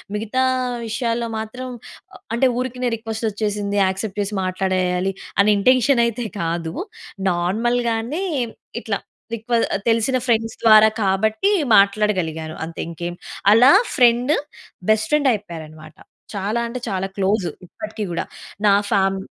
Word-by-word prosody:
మిగతా 225 +5 -1 0.4
విషయాల్లో 230 0 -1
మాత్రం 250 +4 -6 0.7
అంటే 265 - +2
ఊరికినే 250 -1 -2
రిక్వెస్ట్ 225 0 -5
వచ్చేసింది, 205 -1 -2
యాక్సెప్ట్ 190 +2 -3
చేసి 200 +1 -3
మాట్లాడేయాలి 185 0 0 0.3
అనే 205 +1 +5
ఇంటెన్షన్ 255 +2 +4
అయితే 235 +1 -3 0.2
కాదు. 165 0 -2 0.6
నార్మల్‌గానే 230 - 0 0.6
ఇట్ల - - -4 0.4
రిక్వె 230 +1 -1 0.3
తెలిసిన 230 +3 +2
ఫ్రెండ్స్ 225 -2 +1
ద్వారా 215 -1 +8 0.2
కాబట్టి 215 - +1 0.3
మాట్లాడగలిగాను 185 -6 +2
అంతే 165 +1 -6
ఇంకేం 170 +1 -5 0.4
అలా 245 +5 +7 0.2
ఫ్రెండ్, 245 +3 +4 0.6
బెస్ట్ 215 0 +3
ఫ్రెండ్ 290 -3 +3
అయిపోయారు 170 -7 -5
అన్నమాట. 155 0 -14 0.4
చాలా 205 +4 -1
అంటే 250 +2 -5
చాలా 190 0 -2
క్లోజ్ 195 0 +1 0.2
ఇప్పటికి 215 +3 -6
కూడా 170 - -2 0.4
నా 200 - +6 0.2
ఫామ్ 195 -2 +2
215 Hz, 120 wpm, -21 LUFS, 190-235 Hz, 0.7 s, ద్వారా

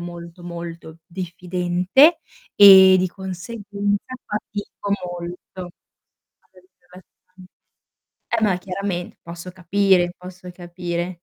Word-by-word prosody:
molto, 175 0 -9
molto 170 -1 -8
diffidente, 180 - +2 0.4
e 190 -2 +9
di 185 - +1
conseguenza 200 +4 -4
fatico 205 -1 -5
molto 175 +1 -8
ad 175 -1 -15 0.5
avere 185 -1 -22
relazioni. 185 +1 -19 0.8
Per 230 -1 -1
me 195 -4 +2
chiarament 185 -1 -5
posso 170 +2 -9
capire, 185 0 +2
posso 180 0 -11
capire. 175 0 -5
180 Hz, 95 wpm, -21 LUFS, 175-195 Hz, 0.8 s, e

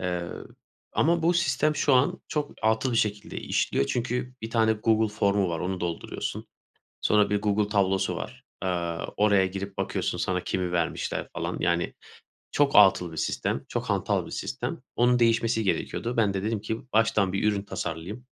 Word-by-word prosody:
Eee, 90 -1 -2 0.7
ama 170 +1 +2
bu 175 +2 +3
sistem 155 -3 +2
şu 140 - +3
an 125 +2 +2
çok 150 -1 -2
atıl 110 +3 +2
bir - - +1
şekilde 105 -2 -1
işliyor 70 - 0
çünkü 125 +1 -2
1 110 - -5
tane 110 -1 +3
Google 110 0 +2
formu 100 -3 +2
var. 85 -1 -2
Onu 95 0 -2
dolduruyorsun. 85 -1 -4 0.6
Sonra 105 -1 +3
1 105 0 +1
Google 105 0 +1
tablosu 95 -2 +1
var, - - -7 0.2
eee, 85 -2 -1 0.2
oraya 100 -2 +4
girip 95 +1 -5
bakıyorsun - - -1
sana 90 -1 -1
kimi 90 -2 -2
vermişler 85 -1 -1
falan. - - -3
Yani, 85 0 0 0.6
çok 145 -1 +3
atıl 95 -4 +6
bir 80 - -9
sistem, - - -1
çok - - -3
hantal - - 0
bir - - -10
sistem. - - -4
Onun 125 0 +3
değişmesi 115 -1 +2
gerekiyordu. 115 +5 -1
Ben 105 -4 +3
de 95 0 -2
dedim 110 -1 -1
ki 110 +1 -3
baştan 105 -4 +3
bir 100 - -1
ürün 100 -1 -2
tasarlayayım. 100 +5 -5
105 Hz, 170 wpm, -27 LUFS, 95-115 Hz, 0.7 s, atıl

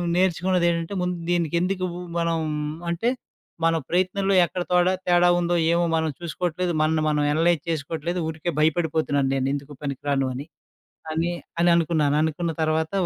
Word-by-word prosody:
నేర్చుకున్నదేంటంటే, 175 -1 +1
ముందు 180 0 -1 0.2
దీనికి 170 -2 0
ఎందుకు 185 0 -1 0.3
మనం 170 -1 0 0.5
అంటే, 175 +8 0 0.6
మన 165 0 +3
ప్రయత్నంలో 185 +2 +1
ఎక్కడ 180 +1 -4
తోడా 180 +1 +4
తేడా 175 0 +5
ఉందో 175 0 +1 0.2
ఏమో 170 0 +2
మనం 160 0 +1
చూసుకోవట్లేదు, 175 +1 -2
మనల్ని 155 0 +2
మనం 150 -1 +1
అనలైజ్ 165 +1 +2
చేసుకోవట్లేదు, 165 +2 -2
ఊరికే 160 +2 -3
భయపడిపోతున్నాను 155 -3 +1
నేను 135 0 0
ఎందుకు 145 +1 -5
పనికి 140 -2 -4
రాను 135 -1 +1
అని. 140 +3 -6 0.7
అని 165 +2 0 0.3
అననుకున్నాను 165 -4 +3
అనుకున్న 160 +2 -1
తర్వాత 160 0 0
170 Hz, 140 wpm, -24 LUFS, 155-175 Hz, 0.7 s, తేడా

